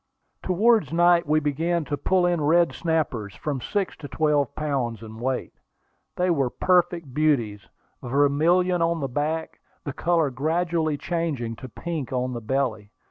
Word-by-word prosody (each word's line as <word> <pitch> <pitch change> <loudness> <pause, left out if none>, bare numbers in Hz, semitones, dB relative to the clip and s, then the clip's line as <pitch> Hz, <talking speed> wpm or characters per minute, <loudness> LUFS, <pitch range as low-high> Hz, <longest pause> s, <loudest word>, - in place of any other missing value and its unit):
Towards 215 +4 +2
night 175 -1 +4
we 155 +1 +3
began 160 +3 -1
to 145 - -2
pull 180 +6 +1
in 175 -2 +1
red 170 +4 +3
snappers 145 - -2
from 140 -4 -3
six 195 +9 -2
to 145 - -8
twelve 145 +1 +1
pounds 130 -7 -2
in 110 0 -10
weight. 130 +1 -2 0.6
They 180 0 +1
were 140 -6 +1
perfect 175 -3 +1
beauties, 120 -9 0 0.3
vermilion 155 +7 +2
on 165 0 +1
the 140 - -2
back, 150 +5 -3 0.2
the 140 - -5
color 165 -3 +1
gradually 160 +2 0
changing 145 -8 -2
to 130 - -9
pink 160 +1 -5
on 125 0 -1
the 120 - -5
belly. 110 -3 -1
150 Hz, 150 wpm, -24 LUFS, 130-170 Hz, 0.6 s, night